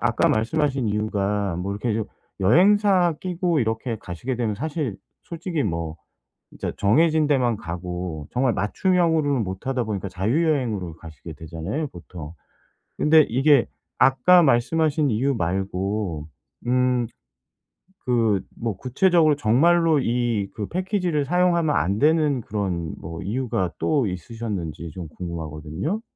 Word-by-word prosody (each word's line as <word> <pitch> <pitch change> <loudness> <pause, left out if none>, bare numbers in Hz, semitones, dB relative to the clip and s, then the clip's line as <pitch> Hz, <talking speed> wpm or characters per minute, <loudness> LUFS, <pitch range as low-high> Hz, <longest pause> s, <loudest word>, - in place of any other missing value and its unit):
아까 - - +2
말씀하신 135 +1 0
이유가 105 -2 -1
뭐 95 +3 -3
이렇게 105 +3 -2
좀 110 -1 -1 0.4
여행사 185 - +4
끼고 175 -4 0
이렇게 110 +1 -2
가시게 105 +10 -4
되면 115 -3 -1
사실 145 - -3 0.3
솔직히 170 -2 -3
뭐 85 -4 -3 0.5
진짜 - - -4
정해진 155 +8 +3
데만 125 -6 +2
가고 85 -2 -5
정말 125 -1 +1
맞춤형으로는 155 - +1
못하다 120 +7 -3
보니까 100 -2 -3
자유 110 - 0
여행으로 105 - -1
가시게 80 0 -10
되잖아요 80 - -5
보통. 85 - -10 0.6
근데 155 +1 +6
이게 135 +1 +4 0.3
아까 170 +7 +5
말씀하신 150 +3 +2
이유 130 +5 +1
말고 95 -2 -2 0.4
음 125 -1 +2 1.0
그 115 -6 +2 0.2
뭐 115 -4 -3
구체적으로 155 +3 +3
정말로 155 +6 +3
이 120 -5 0
그 105 -2 -4
패키지를 180 -4 -1
사용하면 170 -1 +2
안 95 +3 +1
되는 150 -3 +3
그런 90 -7 -3
뭐 80 +1 -7
이유가 110 -5 -1
또 140 -8 +1
있으셨는지 90 -4 -5
좀 85 0 -7
궁금하거든요. 85 - -4
115 Hz, 295 characters per minute, -23 LUFS, 95-150 Hz, 1.0 s, 근데